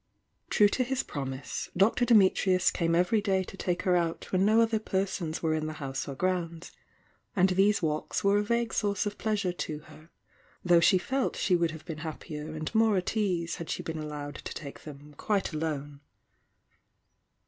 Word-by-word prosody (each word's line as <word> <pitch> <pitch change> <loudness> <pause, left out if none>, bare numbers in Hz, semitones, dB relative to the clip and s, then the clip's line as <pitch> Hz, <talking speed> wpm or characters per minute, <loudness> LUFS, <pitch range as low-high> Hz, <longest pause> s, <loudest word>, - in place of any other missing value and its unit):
True 210 - +5
to 255 - 0
his 265 +1 -1
promise. 135 -1 -5
Dr. 220 +6 +4
Dimitrius 190 -4 +4
came 165 -1 +1
every 180 +5 +3
day 190 -2 +1
to 190 - -10
take 180 -2 -2
her 180 -1 +3
out 170 -2 -1
when 185 0 +2
no 215 +3 +4
other 225 -1 +2
persons 190 -6 -2
were 160 -1 +2
in 155 0 -1
the 155 - -4
house 135 -3 -4
or 140 - -5
grounds, 170 0 -2 0.3
— - - -39
and 190 -1 +4
these 195 +1 +3
walks 155 -1 -1
were 200 +1 +4
a - - 0
vague 235 +2 0
source 205 0 0
of 205 0 -4
pleasure 210 -4 0
to 155 -3 -4
her, 155 +1 -16 0.6
though 175 -1 +6
she 170 +3 +5
felt 260 +8 -1
she 185 - +2
would 170 -1 +2
have 160 -1 -9
been 160 -3 -6
happier 155 -1 -6
and 155 +4 -4
more 220 -2 +4
at 185 +4 -2
ease 180 -6 0
had 170 - -7
she - - -3
been 160 -1 -4
allowed 145 -1 -6
to - - -7
take 140 -2 -9
them 145 0 -11
quite 200 -5 0
alone. 145 -2 -3
180 Hz, 190 wpm, -29 LUFS, 155-205 Hz, 0.6 s, though